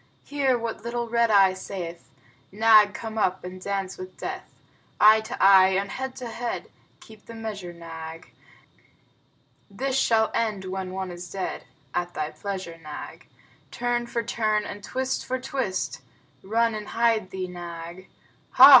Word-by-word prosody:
Hear 275 -3 +1
what 230 -2 -4
little 235 0 -2
Red 235 0 +2
Eye 195 -3 +6
saith: 175 -4 -7 0.4
"Nag, 215 0 +6
come 220 -1 -4
up 185 -2 +1
and 185 +1 -8
dance 195 -1 -3
with 185 0 -8
death!" - - -5 0.5
Eye 215 +1 +8
to 220 - -6
eye 190 -1 +7
and 195 0 -4
head 265 0 -4
to 255 - -7
head, 235 +1 -4 0.3
(Keep 220 -1 -16
the 230 - -9
measure, 210 -5 -5
Nag.) 165 0 -9 1.4
This 260 +7 -2
shall 225 -4 +3
end 215 -4 -1
when 190 0 -4
one 190 0 -4
is 175 0 -8
dead; 190 -2 -4 0.3
(At 175 0 -2
thy 155 0 -2
pleasure, 190 -4 -5
Nag.) 155 -2 -9 0.4
Turn 240 0 -1
for 235 -1 -2
turn 215 -2 0
and 205 - -7
twist 260 +3 -2
for 260 0 -2
twist 255 -7 -2 0.4
(Run 230 +3 +1
and 210 -1 -5
hide 230 -4 +2
thee, 190 -1 -4
Nag.) 175 0 -8 0.4
Hah! - - +11
205 Hz, 155 wpm, -26 LUFS, 185-230 Hz, 1.4 s, Hah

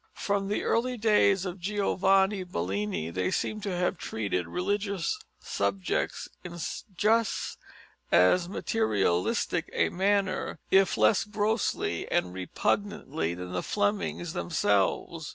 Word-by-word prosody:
From 200 -1 -1
the 205 - -1
early 250 +2 +1
days 205 -3 +3
of 180 +1 -5
Giovanni 195 0 +2
Bellini 95 - -2
they 90 +1 0
seem 215 - -2
to 200 -3 -2
have 180 0 0
treated 100 -6 -2
religious 200 - -1 0.2
subjects 190 -2 -1 0.2
in 175 -1 -7 0.4
just 225 +2 +1 0.5
as 170 - +4
materialistic 100 - 0
a - - +2
manner, 195 0 0
if 195 -1 +4
less 110 - +4
grossly 210 +1 -1
and 90 0 +1
repugnantly, 95 - -1
than 90 0 -7
the 90 0 -1
Flemings 205 -5 -1
themselves. 150 - 0
190 Hz, 115 wpm, -28 LUFS, -, 0.5 s, as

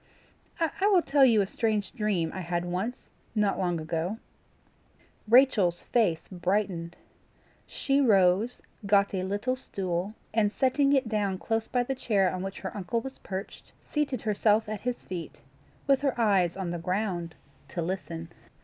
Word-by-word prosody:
I 335 +4 +1
will 365 -4 +5
tell 280 -1 +4
you 230 -5 +6
a - - +1
strange 210 0 -1
dream 210 -9 0
I - - -5
had 175 0 -2
once, 190 +8 -2 0.4
not 210 -2 +1
long 175 -2 0
ago." 165 +6 -2 1.1
Rachel's 220 -8 +4
face 185 -9 +1
brightened. 180 -2 -1 0.7
She 275 +1 +1
rose, 200 -1 +3 0.2
got 200 0 +3
a 190 - -1
little 205 +7 -1
stool, 190 -4 -3 0.2
and 210 -2 +2
setting 275 +4 +2
it 265 -3 +2
down 205 -3 0
close 225 +3 -1
by 245 -1 +1
the 270 - -2
chair 200 -8 +1
on 185 - -3
which 195 +1 -6
her - - -5
uncle 205 +3 -1
was 265 +2 -8
perched, 190 +1 -7 0.2
seated 280 -6 0
herself 215 +1 +2
at 215 -2 -4
his 245 0 -3
feet, 175 -4 -6 0.5
with 275 -1 +3
her 275 -4 0
eyes 195 -6 +3
on 185 -3 -3
the 175 - -3
ground, 180 -2 -2 0.3
to 170 - -3
listen. 170 -2 -4
205 Hz, 160 wpm, -28 LUFS, 180-235 Hz, 1.1 s, you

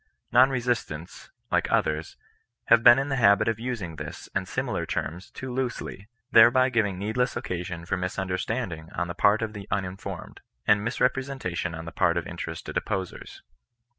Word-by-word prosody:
Non 125 +2 +7
re 130 -2 0
sistants, 115 -9 -3 0.2
like - - +1
others, 75 +1 0 0.5
have 115 0 +7
been 120 +1 +9
in 135 +1 -1
the 135 - 0
habit 100 +1 +5
of 115 -1 0
using 110 -10 -4
this, - - -7
and - - -1
similar - - -2
terms 90 +3 -4
too 130 -1 -7
loosely; 120 -6 -4 0.2
thereby 120 +3 +7
giving 105 -6 +1
needless 110 +6 -1
occasion 85 -1 -4
for 95 - -1
misunderstanding 90 -1 -3
on 85 +1 -1
the 85 - -4
part 100 +5 +3
of 110 -1 -3
the 100 -2 -8
unin 95 0 -2
formed, 95 -3 -7 0.3
and 105 0 +4
misrepresentation 125 -8 -1
on 80 0 -7
the 85 - -6
part 85 -1 +2
of 85 - -1
interested - - -6
opposers. 95 -2 -4
100 Hz, 165 wpm, -26 LUFS, 90-120 Hz, 0.5 s, been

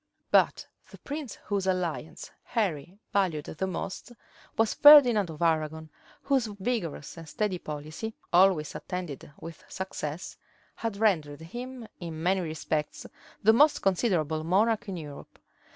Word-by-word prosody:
But - - +3 0.2
the - - -13
prince 290 -5 -6
whose 200 -2 -1
alliance 180 -4 -3
Henry 185 - -2 0.2
valued 175 -7 +1
the 190 +4 -3
most 190 +5 -5 0.5
was 225 -1 +2
Ferdinand 250 - +8
of 160 +1 -5
Arragon, 160 -1 0 0.3
whose 270 -4 +1
vigorous 205 - -4
and 165 -2 -10
steady 205 -1 -1
policy, 155 +9 -6 0.2
always 180 -4 +4
attended 175 -6 -6
with 165 -1 -10
success, 180 -4 -5 0.4
had 225 -3 -3
rendered 160 -9 +1
him 240 +7 -8
in 165 -3 -6
many 185 +2 +2
respects 155 -2 -3 0.4
the 220 +2 +7
most 290 +5 +4
considerable 170 -6 +1
monarch 215 +6 +1
in 185 - -4
Europe. 150 -3 -10
185 Hz, 130 wpm, -28 LUFS, 160-220 Hz, 0.5 s, Ferdinand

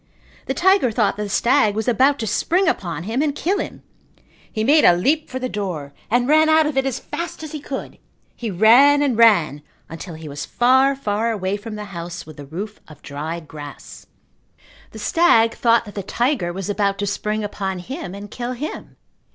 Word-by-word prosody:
The - - -2
tiger 380 -7 +4
thought 215 -2 +1
that - - -4
the - - -7
stag 220 -1 +2
was 220 0 -2
about 265 +4 +3
to 225 - -3
spring 350 - +1
upon 170 - -2
him 225 +8 -1
and 295 -2 0
kill 385 +7 0
him. - - -6 0.7
He 215 - -2
made 295 +6 +5
a - - +7
leap 295 - 0
for 260 - -4
the 255 0 -3
door 180 - -5 0.2
and 245 +2 +2
ran 310 +2 +4
out 315 0 +5
of 300 -2 -2
it 270 0 +1
as 265 - -2
fast 340 -1 -6
as 310 - -7
he 305 - -5
could. 275 -1 -7 0.4
He 235 - -5
ran 245 +9 +5
and 270 -5 +1
ran 185 -11 +4 0.3
until 165 +1 -8
he 160 0 -9
was 145 0 -6
far, 260 +3 +3
far 220 -3 -1
away 200 -3 -1
from 215 +1 -7
the 210 0 -6
house 170 0 -6
with 155 -1 -13
the 145 -1 -10
roof 200 +8 -6
of 155 -2 -15
dried 155 +3 -6
grass. 145 -2 -11 0.8
The - - -12
stag 280 -10 +3
thought 230 -1 +2
that 205 - -10
the 200 - -4
tiger 235 -2 -1
was 190 +1 -5
about 200 -1 0
to 205 - -2
spring 210 +2 -2
upon 195 -2 -3
him 190 -1 -7
and 205 0 -9
kill 245 +1 -4
him. 290 +6 -7
220 Hz, 205 wpm, -21 LUFS, 185-270 Hz, 0.8 s, a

